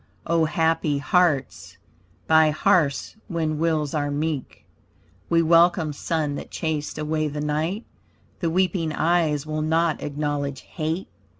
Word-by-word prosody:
O 165 -1 +2
happy 160 -2 +1
hearts, 145 -3 0 0.5
by 160 -1 +5
hearths 155 -2 +1
when 160 -5 -2
wills 155 -3 0
are 145 -2 0
meek! 145 -1 -3 0.6
We 165 0 +3
welcome 165 -1 +4
sun 150 0 -2
that - - -8
chased 155 -2 -3
away 155 0 -1
the 150 0 -5
night. 155 +8 -2 0.5
The 170 - 0
weeping 175 -2 0
eyes 155 -3 +1
will 155 0 -3
not 160 +1 +1
acknowledge 145 -2 -3
hate. 160 +2 -4
155 Hz, 125 wpm, -24 LUFS, 150-165 Hz, 0.6 s, by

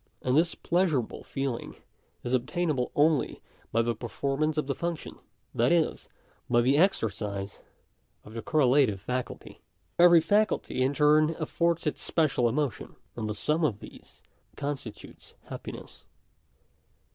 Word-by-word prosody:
And 130 0 +1
this 165 +3 +3
pleasurable 170 -9 0
feeling 135 -4 -4 0.5
is 120 - -3
obtainable 135 +1 0
only 150 0 +2 0.3
by 115 +1 +2
the 120 0 0
performance 140 +7 -2
of 155 - +1
the 140 - -1
function; 170 +2 -5 0.3
that 120 +2 +2
is, 170 -2 +1 0.4
by 120 0 +4
the 130 +4 +3
exercise 105 - 0 0.6
of 105 - -13
the 115 - -5
correlative 130 -6 +3
faculty. 125 +5 -5 0.4
Every 175 -1 +8
faculty 205 -7 +1
in 135 +2 +1
turn 155 +2 +4
affords 170 +1 0
its 150 - -2
special 135 -7 +1
emotion; 135 -2 -2 0.2
and 110 -2 -3
the 105 - -3
sum 155 +8 0
of 115 -10 +1
these - - -14 0.3
constitutes 140 -6 -7
happiness. - - -9
140 Hz, 130 wpm, -28 LUFS, 120-160 Hz, 0.6 s, Every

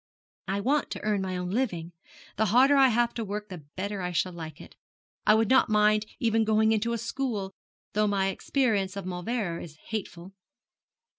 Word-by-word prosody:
'I 195 +1 -1
want 280 +7 +1
to - - -6
earn 210 -2 +1
my 185 -1 -3
own 180 0 -3
living. 185 -8 -1 0.5
The 220 +1 +2
harder 260 +6 +5
I 270 -1 +7
have 240 0 +2
to 230 - -3
work 210 0 -5
the 175 -6 -9
better 200 +1 -3
I 180 0 -2
shall 180 +1 0
like 160 -3 -8
it. - - -13 0.5
I 210 - +7
would 220 0 +2
not 260 -2 +5
mind 210 0 +3
even 225 -1 +2
going 220 0 +3
into 225 +2 +1
a - - 0
school, 230 -4 -3 0.4
though 210 0 +2
my 195 -1 +1
experience 205 -4 0
of 195 - -5
Mauleverer 180 0 -3
is 155 -3 -10
hateful.' 195 -4 -5
210 Hz, 190 wpm, -28 LUFS, 185-225 Hz, 0.5 s, I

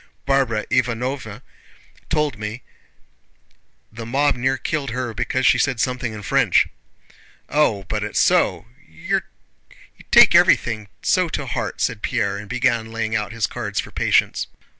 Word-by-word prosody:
Barbara 135 -6 +1
Ivánovna 125 -1 -1 0.7
told 150 -8 0
me 105 +4 -6 1.3
the 115 +1 -8
mob 140 +5 +1
near 130 +2 0
killed 140 +1 -3
her 120 0 -3
because 120 +4 -1
she - - +5
said 135 -4 0
something 125 -1 -1
in 105 -1 -8
French." - - +3 0.8
"Oh, 125 -9 +1
but - - -3
it's - - -2
so... - - +2 0.2
You 80 +1 -2 0.9
take - - +7
everything 110 -3 +3 0.2
so 185 -2 +2
to 140 - -3
heart," 120 - -4
said 115 -4 -1
Pierre, 105 -5 -1
and 100 0 -9
began 120 -2 0
laying 115 0 -2
out 105 -3 -2
his 115 -2 -1
cards 105 -5 -4
for - - -5
patience. - - +1
120 Hz, 140 wpm, -21 LUFS, 110-130 Hz, 1.3 s, take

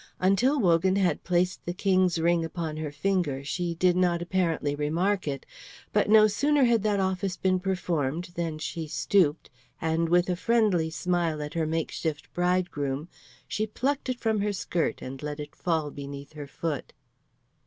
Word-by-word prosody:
Until 195 +10 +3
Wogan 185 -2 +3
had 185 -6 +1
placed 180 +1 0
the 175 - -4
King's 185 -3 +2
ring 170 +1 +2
upon 165 -1 -4
her 155 -2 -4
finger, 150 -4 -1
she 170 +4 -2
did 180 +1 +3
not 180 -1 +2
apparently 175 -4 0
remark 170 +6 0
it; 140 -2 -3 0.5
but - - +2
no 215 0 +8
sooner 285 +7 +2
had 235 -3 +4
that 205 -1 +1
office 190 -1 -1
been 185 -1 +1
performed 175 -3 -2
than 165 -3 -3
she 160 +1 -4
stooped, 150 +2 +1 0.3
and 165 +1 0
with 175 +1 +4
a 180 - 0
friendly 205 -5 +2
smile 170 -1 -1
at 150 +1 -5
her 165 -2 0
makeshift 160 -1 -3
bridegroom, 175 -5 -1 0.4
she 215 +1 -1
plucked 270 +5 -2
it 250 -1 -2
from 220 -2 +1
her 205 0 0
skirt 175 -3 -2
and 130 +1 -7
let 150 0 -5
it 150 0 -7
fall 160 -4 -1
beneath 140 +1 -8
her 145 -2 -7
foot. 150 0 -4
175 Hz, 165 wpm, -27 LUFS, 155-190 Hz, 0.5 s, no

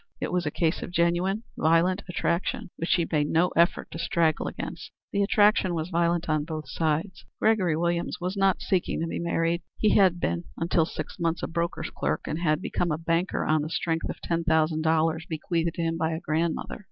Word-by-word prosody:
It - - -3
was 180 -3 0
a - - +2
case 160 +2 0
of - - -5
genuine, 175 +4 +1
violent 170 +4 +3
attraction, 190 +4 -1
which 165 - -4
she 170 -3 +3
made 150 -1 +1
no 170 +3 +3
effort 170 +2 +1
to 165 - -6
straggle 170 -1 +1
against. - - -6 0.2
The 200 - +2
attraction 205 -2 +3
was 165 +2 -3
violent 170 0 +1
on 155 -2 +1
both 155 -2 -6
sides. 160 +5 -1 0.2
Gregory 190 -8 +2
Williams 170 +1 -1
was 180 +2 -3
not 195 -1 +2
seeking 185 -2 0
to - - 0
be 165 - -3
married. 170 0 0 0.2
He 215 - +3
had 185 -3 +4
been, 85 - -1
until 165 -1 +2
within - - -10
six 155 - -6
months, 165 -1 -1
a - - 0
broker's 170 +1 -2
clerk, 75 +3 -1
and 155 - -3
had 155 0 +1
become 175 -2 -1
a 150 - 0
banker 165 +2 0
on 155 0 +2
the 155 - -4
strength 165 0 -1
of - - -5
ten 170 0 -1
thousand 160 -1 +2
dollars 160 +1 +1
bequeathed 165 +1 -1
to 170 - -2
him 165 0 0
by 160 0 0
a 160 - -3
grandmother. 165 0 -2
170 Hz, 210 wpm, -27 LUFS, 160-175 Hz, 0.2 s, had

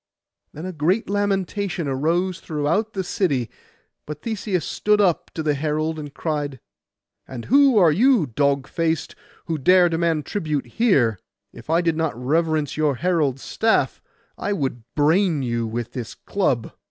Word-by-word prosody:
Then 155 +4 -8
a 185 - -4
great 180 +8 0
lamentation 195 -4 -1
arose 165 +7 0
throughout 160 +9 -1
the 190 - -2
city. 145 - -1 0.6
But 150 0 -7
Theseus 205 -6 -2
stood 210 0 +1
up 185 -5 +2
to 160 - -3
the 150 -1 +2
herald, 155 +2 -1
and 145 -1 -7
cried— 145 -4 -3 0.7
'And 125 -3 -7
who 275 -2 +5
are 175 -6 +6
you, 230 - +4
dog 140 +2 0
faced, 165 -2 -1 0.3
who 160 -2 -2
dare 180 +5 +5
demand 165 -2 0
tribute 155 -8 -2
here? 135 - +2 0.3
If 120 - -13
I 165 +2 +3
did 165 -2 0
not 160 -7 -1
reverence 155 +2 0
your 150 -3 +2
herald's 145 -3 0
staff, 225 0 +1 0.4
I 205 - -1
would 135 -9 -2
brain 160 0 +2
you 120 -2 -1
with 120 +1 -4
this 120 -4 -6
club. 135 - -1
160 Hz, 155 wpm, -22 LUFS, 140-185 Hz, 0.7 s, are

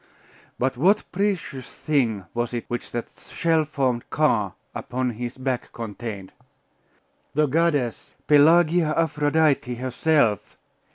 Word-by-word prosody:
But 130 0 -1
what 185 +10 +3
precious 180 -9 -2
thing 120 - -1
was 120 0 -2
it 120 - -4
which 120 - -4
that 120 -1 -5 0.2
shell 165 -2 +2
formed 130 -5 -1
car 110 -11 +1 0.2
upon 125 0 -2
his 120 +2 -6
back 130 -2 -3
contained? 110 -3 -6 1.0
The 150 +1 +4
goddess! 145 -5 0
Pelagia 155 +2 +5
Aphrodite 150 -4 +1
herself? 130 - 0
135 Hz, 110 wpm, -24 LUFS, 120-155 Hz, 1.0 s, Pelagia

